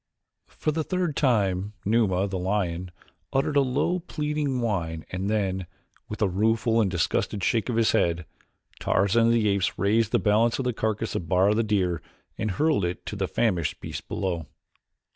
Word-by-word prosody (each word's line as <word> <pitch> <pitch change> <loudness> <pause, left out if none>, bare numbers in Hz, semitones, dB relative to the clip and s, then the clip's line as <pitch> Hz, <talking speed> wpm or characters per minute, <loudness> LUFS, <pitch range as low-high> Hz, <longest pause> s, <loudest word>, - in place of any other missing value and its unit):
For 155 - -2
the 160 +1 -1
third 180 -3 -1
time 100 -7 +1
Numa, 100 -3 +2
the 95 -1 -3
lion, 90 -2 -1 0.4
uttered 135 +2 +1
that 145 - +4
low 140 +7 0
pleading 150 -5 -2
whine 85 -9 -2
and 95 +2 -2
then, 95 -4 -1 0.4
with 105 0 -2
a - - +4
rueful 110 +4 +2
and 100 - +2
disgusted 90 +2 -1
shake 115 +4 +1
of 120 - 0
his 115 -1 +3
head, 85 0 +1 0.5
Tarzan 115 +4 +3
of 115 - +4
the 115 -2 +2
Apes 100 -2 0
raised 110 +2 +2
the - - +4
balance 110 +2 +2
of 135 - -3
the 125 - 0
carcass 110 0 -2
of 85 - -4
Bara, 95 +3 +4
the 110 - +2
deer, 95 -6 0 0.3
and 110 - -2
hurled 145 - +1
it 90 0 -3
to - - -5
the 95 -2 -1
famished 90 -10 0
beast - - -7
below. 85 -5 -2
105 Hz, 180 wpm, -26 LUFS, 95-115 Hz, 0.5 s, that